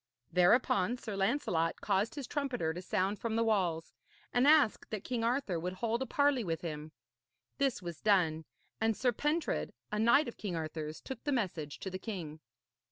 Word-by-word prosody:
Thereupon 180 Hz, +4 st, +3 dB
Sir 220 Hz, -4 st, -6 dB
Lancelot 195 Hz, -, 0 dB
caused 205 Hz, +4 st, 0 dB
his 285 Hz, -3 st, -4 dB
trumpeter 245 Hz, -, -1 dB
to 180 Hz, -, -6 dB
sound 190 Hz, +2 st, 0 dB
from 230 Hz, -1 st, -2 dB
the 230 Hz, -, +3 dB
walls, 180 Hz, -7 st, 0 dB, 0.4 s
and 245 Hz, +3 st, +4 dB
ask 300 Hz, -7 st, +4 dB
that 215 Hz, -3 st, -4 dB
King 240 Hz, -3 st, -2 dB
Arthur 235 Hz, -7 st, 0 dB
would 180 Hz, +2 st, -3 dB
hold 230 Hz, +5 st, -1 dB
a 265 Hz, -, -2 dB
parley 285 Hz, -4 st, +2 dB
with 165 Hz, -4 st, -2 dB
him. 155 Hz, -2 st, -5 dB, 0.7 s
This 275 Hz, -8 st, +1 dB
was 170 Hz, -3 st, -6 dB
done, 165 Hz, -6 st, +3 dB, 0.3 s
and 225 Hz, -1 st, +1 dB
Sir 250 Hz, -1 st, +2 dB
Pentred, 300 Hz, +7 st, -1 dB, 0.2 s
a 210 Hz, -, -1 dB
knight 235 Hz, +7 st, +5 dB
of 240 Hz, -, -7 dB
King 195 Hz, -5 st, -4 dB
Arthur's, 155 Hz, -1 st, -4 dB
took 265 Hz, -3 st, -7 dB
the 290 Hz, -, -1 dB
message 175 Hz, -, -2 dB
to 190 Hz, -, -4 dB
the 185 Hz, -, -4 dB
king. 170 Hz, -9 st, -6 dB
210 Hz, 180 wpm, -33 LUFS, 170-245 Hz, 0.7 s, knight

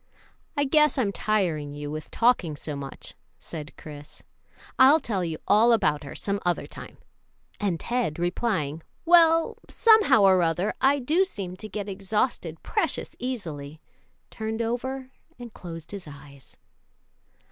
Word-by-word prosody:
"I 285 Hz, -, +3 dB
guess 300 Hz, +2 st, +3 dB
I'm 220 Hz, -7 st, +1 dB
tiring 170 Hz, -10 st, -1 dB
you 145 Hz, 0 st, -6 dB
with 155 Hz, 0 st, -6 dB
talking 230 Hz, -10 st, +2 dB
so 145 Hz, 0 st, -5 dB
much," 140 Hz, -1 st, -8 dB, 0.2 s
said 150 Hz, -3 st, -9 dB
Chris; 145 Hz, -1 st, -11 dB, 0.6 s
"I'll 275 Hz, +5 st, +7 dB
tell 200 Hz, -, -2 dB
you 165 Hz, -2 st, -3 dB
all 230 Hz, +3 st, +5 dB
about 150 Hz, -10 st, +1 dB
her 140 Hz, -, -8 dB
some 200 Hz, 0 st, -2 dB
other 175 Hz, -1 st, 0 dB
time;" -, -, -11 dB, 0.6 s
and 190 Hz, -6 st, -1 dB
Ted, 235 Hz, -11 st, -1 dB
replying, 175 Hz, -4 st, -1 dB, 0.2 s
"Well, 330 Hz, -1 st, +5 dB
somehow 430 Hz, -, +5 dB
or 190 Hz, -2 st, +6 dB
other, 175 Hz, +4 st, 0 dB
I 275 Hz, +2 st, +4 dB
do 305 Hz, +8 st, +2 dB
seem 195 Hz, -, -5 dB
to 215 Hz, +2 st, -8 dB
get 205 Hz, -1 st, -5 dB
exhausted 195 Hz, -4 st, -2 dB
precious 425 Hz, -, -2 dB
easily," 160 Hz, -, -5 dB, 0.5 s
turned 220 Hz, +1 st, -3 dB
over 260 Hz, +3 st, -3 dB, 0.3 s
and 240 Hz, -2 st, -10 dB
closed 165 Hz, -2 st, -9 dB
his 200 Hz, -5 st, -8 dB
eyes. 140 Hz, -1 st, -14 dB
200 Hz, 140 wpm, -26 LUFS, 160-250 Hz, 0.6 s, I'll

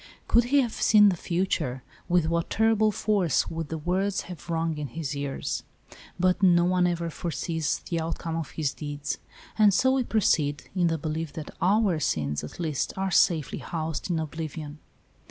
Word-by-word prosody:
Could 235 Hz, 0 st, +4 dB
he 280 Hz, +3 st, +4 dB
have 235 Hz, -4 st, -2 dB
seen 210 Hz, -1 st, +6 dB
the 185 Hz, -, 0 dB
future, 165 Hz, -8 st, -1 dB, 0.3 s
with 175 Hz, -2 st, +3 dB
what 170 Hz, +1 st, -1 dB
terrible 220 Hz, -1 st, +3 dB
force 195 Hz, -7 st, +1 dB
would 165 Hz, -2 st, -4 dB
the 160 Hz, -, -3 dB
words 185 Hz, +5 st, 0 dB
have 175 Hz, -1 st, -10 dB
rung 165 Hz, -2 st, -1 dB
in 145 Hz, -, -3 dB
his 145 Hz, +2 st, -4 dB
ears. 140 Hz, -1 st, -3 dB, 0.6 s
But 185 Hz, +2 st, +2 dB
no 175 Hz, -2 st, +5 dB
one 180 Hz, 0 st, +3 dB
ever 170 Hz, -1 st, -2 dB
foresees 160 Hz, 0 st, -2 dB
the 170 Hz, -2 st, -1 dB
outcome 165 Hz, 0 st, -3 dB
of 165 Hz, -3 st, -3 dB
his 150 Hz, -4 st, -2 dB
deeds; 145 Hz, -2 st, -4 dB, 0.4 s
and 210 Hz, -1 st, +7 dB
so 260 Hz, +7 st, +3 dB
we 265 Hz, -1 st, +2 dB
proceed, 155 Hz, -11 st, +1 dB
in 180 Hz, -2 st, +3 dB
the 165 Hz, -1 st, 0 dB
belief 155 Hz, 0 st, -4 dB
that 155 Hz, -2 st, -7 dB
our 195 Hz, -3 st, +3 dB
sins, 75 Hz, -, -1 dB
at 75 Hz, -, -9 dB
least, 155 Hz, -5 st, -1 dB
are 190 Hz, 0 st, -1 dB
safely 160 Hz, -4 st, +2 dB
housed 160 Hz, +1 st, -4 dB
in 170 Hz, -, +1 dB
oblivion. 155 Hz, -1 st, -5 dB
165 Hz, 175 wpm, -27 LUFS, 155-185 Hz, 0.6 s, and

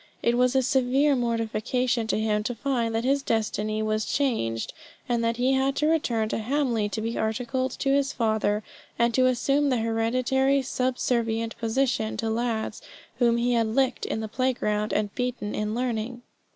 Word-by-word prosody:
It 235 Hz, -, +3 dB
was 250 Hz, +1 st, +2 dB
a 265 Hz, -, +4 dB
severe 265 Hz, +2 st, +3 dB
mortification 235 Hz, 0 st, 0 dB
to 220 Hz, -, 0 dB
him 215 Hz, -1 st, +1 dB
to 245 Hz, -, -2 dB
find 235 Hz, -3 st, -1 dB
that 225 Hz, -, 0 dB
his 275 Hz, +2 st, +2 dB
destiny 215 Hz, -2 st, -1 dB
was 215 Hz, 0 st, 0 dB
changed, 215 Hz, -, -1 dB, 0.3 s
and 235 Hz, -1 st, 0 dB
that 230 Hz, 0 st, 0 dB
he 255 Hz, +2 st, +2 dB
had 270 Hz, +1 st, +1 dB
to 300 Hz, -, +1 dB
return 250 Hz, -9 st, +1 dB
to -, -, -1 dB
Hamley 235 Hz, -3 st, 0 dB
to 220 Hz, -, -3 dB
be 230 Hz, +1 st, -2 dB
articled 250 Hz, +4 st, -1 dB
to 275 Hz, -, -1 dB
his 275 Hz, 0 st, +2 dB
father, 215 Hz, -3 st, 0 dB, 0.3 s
and 235 Hz, 0 st, +2 dB
to 255 Hz, +1 st, +4 dB
assume 275 Hz, +3 st, +2 dB
the 255 Hz, -, +2 dB
hereditary 255 Hz, +4 st, +1 dB
subservient 235 Hz, -3 st, -1 dB
position 230 Hz, -1 st, 0 dB
to 225 Hz, -1 st, -1 dB
lads 225 Hz, -1 st, -2 dB, 0.4 s
whom 235 Hz, -1 st, +4 dB
he 245 Hz, +1 st, +1 dB
had 230 Hz, -2 st, +2 dB
licked 260 Hz, +3 st, 0 dB
in 220 Hz, -, -2 dB
the 220 Hz, -, -3 dB
play 255 Hz, +4 st, 0 dB
ground, 210 Hz, -3 st, -1 dB
and 210 Hz, 0 st, -1 dB
beaten 245 Hz, -4 st, -3 dB
at 210 Hz, -, -1 dB
learning. 240 Hz, +1 st, -3 dB
235 Hz, 180 wpm, -26 LUFS, 220-255 Hz, 0.4 s, a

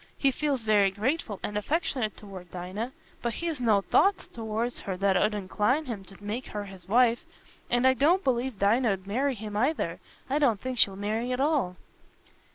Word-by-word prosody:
He 275 Hz, -, +3 dB
feels 275 Hz, -2 st, -1 dB
very 210 Hz, -2 st, +4 dB
grateful 215 Hz, -, -2 dB
and 210 Hz, -, -3 dB
affectionate 250 Hz, -1 st, -1 dB
toward 190 Hz, -4 st, -10 dB
Dinah, 185 Hz, +8 st, -5 dB, 0.3 s
but 235 Hz, -1 st, -1 dB
he's 330 Hz, -6 st, -3 dB
no 215 Hz, -4 st, +4 dB
thoughts 390 Hz, -, +2 dB
towards 225 Hz, +1 st, -3 dB
her 190 Hz, -2 st, -4 dB
that 195 Hz, 0 st, +2 dB
'ud 210 Hz, +3 st, +2 dB
incline 210 Hz, +9 st, 0 dB
him 225 Hz, -7 st, -5 dB
to 195 Hz, +1 st, -14 dB
make 220 Hz, +5 st, -4 dB
her 210 Hz, -1 st, -4 dB
his 190 Hz, -3 st, -12 dB
wife, 240 Hz, +1 st, +4 dB, 0.5 s
and 245 Hz, +1 st, +2 dB
I 260 Hz, -, +7 dB
don't 320 Hz, -, +3 dB
believe 250 Hz, -2 st, 0 dB
Dinah 215 Hz, +3 st, +3 dB
'ud 190 Hz, -1 st, -7 dB
marry 260 Hz, +7 st, 0 dB
him 210 Hz, -1 st, -7 dB
either. 265 Hz, +9 st, 0 dB, 0.3 s
I 280 Hz, +2 st, +1 dB
don't 240 Hz, -9 st, +3 dB
think 255 Hz, -2 st, -3 dB
she'll 195 Hz, -, +5 dB
marry 215 Hz, +5 st, -2 dB
at 250 Hz, -, -1 dB
all." 275 Hz, -, +1 dB
225 Hz, 185 wpm, -28 LUFS, 200-260 Hz, 0.5 s, I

